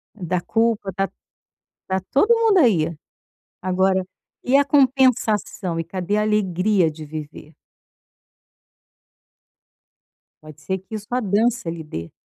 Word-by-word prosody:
da 180 -2 -2
culpa, 225 -1 0
da 195 0 0 0.8
tá 190 0 0
todo 430 +12 +4
mundo 445 -4 +3
aí. 170 - +3 0.7
Agora, 185 +1 +1 0.4
e 265 +2 +4
a 285 - +3
compensação? 255 - +2
E - - -1
cadê 185 +4 -2
a - - +2
alegria 195 -3 +1
de 155 0 -9
viver? 155 0 -9 2.9
Pode 155 -1 -14
ser 190 +5 -3
que 190 +4 -9
isso 210 0 -7
a 250 - +1
dança 220 -1 0
lhe 165 -1 -6
dê. 85 - -7
195 Hz, 120 wpm, -22 LUFS, 170-230 Hz, 2.9 s, todo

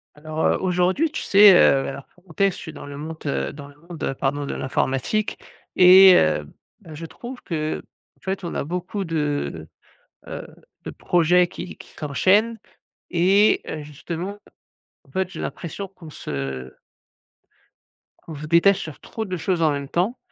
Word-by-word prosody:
Alors, 155 +1 -3
heu, - - +2
aujourd'hui 185 - +1
tu - - -4
sais, 200 -1 +7
heu, 135 -5 +5
oui - - -4
alors 135 0 -8 0.2
quand 165 +1 -8
est-ce 195 -2 +3
je - - -9
suis 160 - -8
dans 145 - -9
le 140 0 -8
monte 155 +1 -7
dans 140 0 -3
le 145 - -16
monde 165 -2 -5
pardon 145 +1 -1
de - - -4
l'informatique 135 +10 -1 0.4
et 185 +1 +9
heu, 75 -1 +2 0.3
bah, 160 - -12
je 165 +2 -7
trouve 245 +9 -9
qu'en 155 -2 -2 0.4
fait 190 0 -4
on 170 - -5
a - - -1
beaucoup 180 +5 -4
de, 145 - -2 0.6
heu, - - -7 0.4
de - - -5
projets 175 +1 +3
qui 180 0 -8
qui - - -14
s'enchaînent 200 +10 +2 0.5
et 195 +5 +4
heu, 155 - -5
justement 170 +7 -6 0.7
en - - -24
fait, 190 -1 -1
j'ai - - -8
l'impression 195 +3 -5
qu'on 180 -4 -13
se 65 - -5 1.6
qu'on 160 - -7
se 150 +1 -7
détache 170 +5 +4
sur 155 -6 -8
trop 220 - -5
de 185 -2 -4
choses 175 +1 -1
en 155 -2 +4
même 140 -1 -3
temps, 195 +9 0
170 Hz, 170 wpm, -23 LUFS, 145-190 Hz, 1.6 s, et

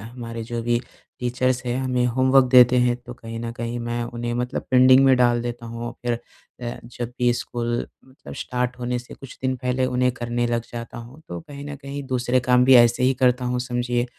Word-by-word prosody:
हमारे 115 -2 -6
जो 115 +1 -4
भी 120 0 +1 0.4
टीचर्स 125 +1 0
हैं, 120 +1 -1
हमें 125 -1 +1
होमवर्क 130 +2 +4
देते 125 -1 +7
हैं 125 0 +3
तो 125 - -8
कहीं 115 -1 -8
न 115 0 -4
कहीं 120 0 -4
मैं 120 0 -3
उन्हें 120 0 -4
मतलब 125 +1 -2
पेंडिंग 130 +1 +7
में 130 -1 +6
डाल 120 -1 +3
देता 120 0 -5
हूँ 115 +1 -5
फिर 120 - +1 0.5
अ, 120 0 -5
जब 120 0 -6
भी 120 -1 +4
स्कूल 120 0 -3 0.3
मतलब 130 +1 -12
स्टार्ट 125 -1 -3
होने 125 0 -2
से 125 - -12
कुछ 135 - -12
दिन 130 0 0
पहले 125 +1 -1
उन्हें 125 0 +1
करने 120 0 -2
लग 120 0 0
जाता 120 +1 -7
हूँ 120 +6 -11
तो 85 -1 -5
कहीं 140 - -10
न 145 - -6
कहीं 140 0 -7
दूसरे 125 0 +1
काम 125 0 +3
भी 130 - +7
ऐसे 120 0 +5
ही 130 +1 +4
करता 125 0 +3
हूँ 125 0 -1
समझिए 120 0 -1
125 Hz, 210 wpm, -23 LUFS, 120-125 Hz, 0.5 s, देते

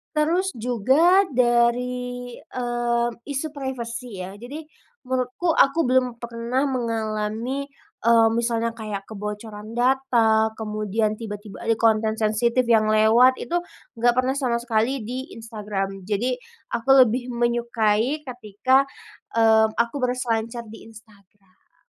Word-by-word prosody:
Terus 340 +5 +1
juga 265 - +3
dari, 245 0 0
mmm, 240 -1 -2
isu 285 +2 -2
privasi 250 -3 -5
ya, 190 - -7
jadi 285 +7 -8 0.4
menurutku 260 +6 0
aku 275 +2 +4
belum 255 -1 +2
pernah 235 +3 -2
mengalami, 230 +2 -2 0.4
mmm, 230 -1 +5
misalnya 230 -1 0
kayak 210 -3 -5
kebocoran 210 +1 -7
data, 240 -4 +3
kemudian 215 0 -1
tiba-tiba 210 -2 -8
ada 225 - +3
konten 220 -1 +2
sensitif 235 +3 +1
yang 220 -2 +4
lewat, 225 +4 +5
itu 350 +1 -1 0.4
nggak 240 +1 +3
pernah 255 +1 +2
sama 250 -4 0
sekali 235 +2 0
di 250 +3 -4 0.2
Instagram. 205 -4 -5
Jadi 230 +5 0 0.4
aku 235 +3 -3 0.2
lebih 245 +3 -2
menyukai 235 +3 0
ketika, 255 +2 +1 0.5
mmm, 220 -1 +4
aku 235 +4 0
berselancar 235 -2 -1
di 225 - -12
Instagram. 205 - -21
235 Hz, 115 wpm, -23 LUFS, 220-255 Hz, 0.5 s, mmm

